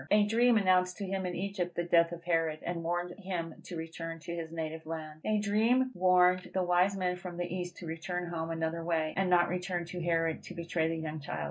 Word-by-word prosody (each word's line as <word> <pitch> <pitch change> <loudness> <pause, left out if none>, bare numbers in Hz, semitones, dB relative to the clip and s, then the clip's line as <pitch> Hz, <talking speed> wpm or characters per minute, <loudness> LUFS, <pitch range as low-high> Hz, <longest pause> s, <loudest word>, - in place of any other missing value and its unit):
A 210 0 +5
dream 230 +2 +4
announced 185 -2 +3
to 200 - -3
him 190 -1 -2
in 180 - -3
Egypt 190 -2 -2
the 175 - 0
death 170 -1 +4
of 170 -1 -7
Herod, 165 -2 +1
and 170 -1 -2
warned 175 +1 -1
him 180 -4 -3
to 180 - -6
return 165 0 -5
to 170 - -5
his 165 -1 -5
native 160 -1 -5
land. 155 -1 -6
A 215 0 +2
dream 225 +5 +3
warned 180 -1 +4
the 185 - +2
wise 180 +2 +3
men 180 -1 0
from 180 -1 -7
the 175 - -1
east 175 0 -4
to 175 - -8
return 175 +2 -3
home 165 -1 -3
another 165 0 -2
way, 160 -2 0
and 190 -1 +1
not 175 -1 +5
return 180 -1 -2
to 175 +1 -6
Herod 165 -1 +1
to - - -8
betray 170 -1 0
the 165 - -1
young 155 -1 -4
child. 80 - -5
175 Hz, 230 wpm, -31 LUFS, 165-185 Hz, -, A